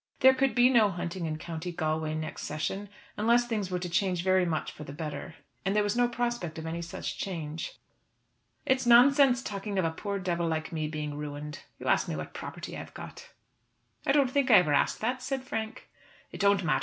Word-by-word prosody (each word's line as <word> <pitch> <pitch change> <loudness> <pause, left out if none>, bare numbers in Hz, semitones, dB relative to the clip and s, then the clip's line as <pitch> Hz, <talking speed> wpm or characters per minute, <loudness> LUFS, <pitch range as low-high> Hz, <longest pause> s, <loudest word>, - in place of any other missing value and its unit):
There 265 0 +8
could 265 0 +1
be 245 0 +6
no 225 -5 +5
hunting 175 -1 -4
in 155 -1 -3
County 165 +2 -5
Galway 155 -2 -1
next 155 0 -5
session 190 +7 -3 0.3
unless 235 +3 +4
things 215 -5 -2
were 180 - -1
to 180 0 -4
change 180 0 0
very 185 -1 +3
much 160 -2 -2
for 150 - -10
the 140 - -8
better. 155 +1 -6 0.3
And 195 +2 0
there 210 - +4
was 205 +1 0
no 245 0 +4
prospect 240 -9 -2
of 160 - -6
any 165 +1 -3
such 170 - -5
change. 160 -4 -4 0.9
"It's 260 -2 +2
nonsense 260 +1 +6
talking 200 -1 -4
of 185 - +2
a 165 - +1
poor 200 +4 -3
devil 175 -3 -1
like 160 -1 -2
me 155 -2 -2
being 150 -1 -4
ruined. 150 +1 -6 0.2
You - - -10
ask - - +3
me - - -2
what - - -6
property - - -7
I - - -5
have - - -10
got." - - -9 0.7
"I - - +2
don't 275 -3 +3
think 280 -1 +2
I 225 - +8
ever 155 -6 +5
asked - - +2
that," 250 +3 -1
said 270 0 -3
Frank. 225 -1 -5 0.4
"It - - -8
don't 200 -1 +4
matter. 150 -5 +2
185 Hz, 215 wpm, -29 LUFS, 160-240 Hz, 0.9 s, There